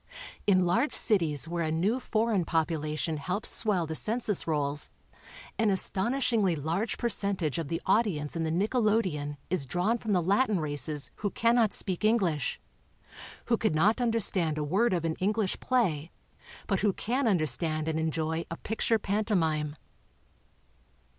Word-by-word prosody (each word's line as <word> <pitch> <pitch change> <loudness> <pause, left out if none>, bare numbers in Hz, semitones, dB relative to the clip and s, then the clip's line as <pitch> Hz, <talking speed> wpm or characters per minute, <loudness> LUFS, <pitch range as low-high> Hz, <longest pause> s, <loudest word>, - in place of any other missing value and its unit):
In 185 -3 +4
large 230 +12 +1
cities 165 - +3
where 170 0 -2
a 155 - -1
new 195 +10 +1
foreign 220 -5 0
population 160 -1 -1
helps 185 +8 -1
swell 200 -6 +1
the 160 - -5
census 215 +2 0
rolls 145 - +1 0.7
an 220 -1 +3
aston 195 +3 0
ishingly 220 -10 +1
large 165 +10 -2
percentage 200 - -1
of 165 - -3
the 165 +3 -2
audience 175 -11 +1
in 165 - -2
the 160 - -1
nickelodeeon 195 - 0
is 155 -7 0
drawn 195 - 0
from 220 - -4
the 180 - +3
Latin 200 +2 +2
races 145 -1 -1
who 205 - -2
cannot 230 0 +2
speak 185 0 -3
English, 190 - +1 0.9
who - - +2
could - - 0
not 210 +10 +3
understand 195 -9 +1
a 150 - -1
word 195 +11 +1
of 170 -3 -1
an 160 -1 -2
English 205 +1 0
play, 175 - 0 0.6
but 195 - 0
who 205 -1 +2
can 245 +6 -1
understand 155 -4 +1
and 160 0 -1
enjoy 160 +1 -1
a 165 - -5
picture 225 +1 0
pantomime. 180 -8 -1
180 Hz, 150 wpm, -28 LUFS, 160-215 Hz, 0.9 s, In